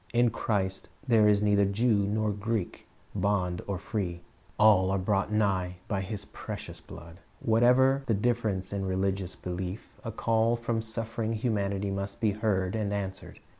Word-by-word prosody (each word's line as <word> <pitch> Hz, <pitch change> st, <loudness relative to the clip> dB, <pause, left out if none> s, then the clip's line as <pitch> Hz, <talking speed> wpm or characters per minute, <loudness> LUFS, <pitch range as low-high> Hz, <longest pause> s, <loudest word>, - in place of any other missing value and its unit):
In 120 Hz, 0 st, +4 dB
Christ 95 Hz, -3 st, -2 dB, 0.2 s
there 110 Hz, -3 st, +5 dB
is 105 Hz, 0 st, +4 dB
neither 100 Hz, -1 st, +4 dB
Jew 100 Hz, 0 st, +2 dB
nor 110 Hz, +1 st, 0 dB
Greek, 105 Hz, -1 st, -3 dB, 0.3 s
bond 90 Hz, -3 st, 0 dB
nor 100 Hz, -2 st, -1 dB
free. 90 Hz, -3 st, -3 dB, 0.4 s
All 105 Hz, -3 st, +5 dB
are 95 Hz, -, +1 dB
brought 100 Hz, +2 st, 0 dB
nigh 95 Hz, -4 st, +1 dB
by 100 Hz, -2 st, -1 dB
His 100 Hz, +1 st, -5 dB
precious -, -, -7 dB
blood.' 85 Hz, +2 st, -12 dB, 0.2 s
Whatever 125 Hz, +4 st, +4 dB
the 115 Hz, -, +2 dB
difference 105 Hz, -4 st, 0 dB
in 100 Hz, -1 st, -2 dB
religious 95 Hz, 0 st, -1 dB
belief, 90 Hz, +3 st, -6 dB
a 115 Hz, -, -4 dB
call 115 Hz, +1 st, +2 dB
from 115 Hz, -1 st, -1 dB
suffering 115 Hz, 0 st, -3 dB
humanity 100 Hz, -3 st, -1 dB
must 100 Hz, 0 st, -4 dB
be 110 Hz, -2 st, +2 dB
heard 100 Hz, -3 st, 0 dB
and 105 Hz, -2 st, -1 dB
answered. 100 Hz, -2 st, -5 dB
100 Hz, 155 wpm, -29 LUFS, 95-110 Hz, 0.4 s, there